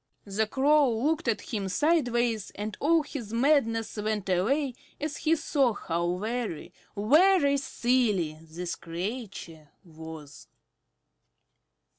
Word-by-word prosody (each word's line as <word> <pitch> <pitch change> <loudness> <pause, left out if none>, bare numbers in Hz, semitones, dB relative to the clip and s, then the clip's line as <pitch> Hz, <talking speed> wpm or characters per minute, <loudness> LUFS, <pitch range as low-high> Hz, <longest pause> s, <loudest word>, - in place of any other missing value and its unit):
The 210 +2 -1
Crow 285 +3 +4
looked 305 +5 0
at 230 - +1
him 200 -3 -2
sideways, 240 - +1
and 210 +1 -4
all 320 +2 +3
his 245 -8 -7
madness 230 -4 +2
went 210 -2 -2
away 255 +10 +1 0.3
as 300 0 -3
he 320 +1 +2
saw 280 -6 +1
how 170 -2 -2
very, 215 -4 -4 0.2
very 290 - +4
silly 225 - 0
this 170 +2 -5
creature 170 - -6
was. 160 -3 -11
225 Hz, 110 wpm, -28 LUFS, 180-280 Hz, 0.3 s, Crow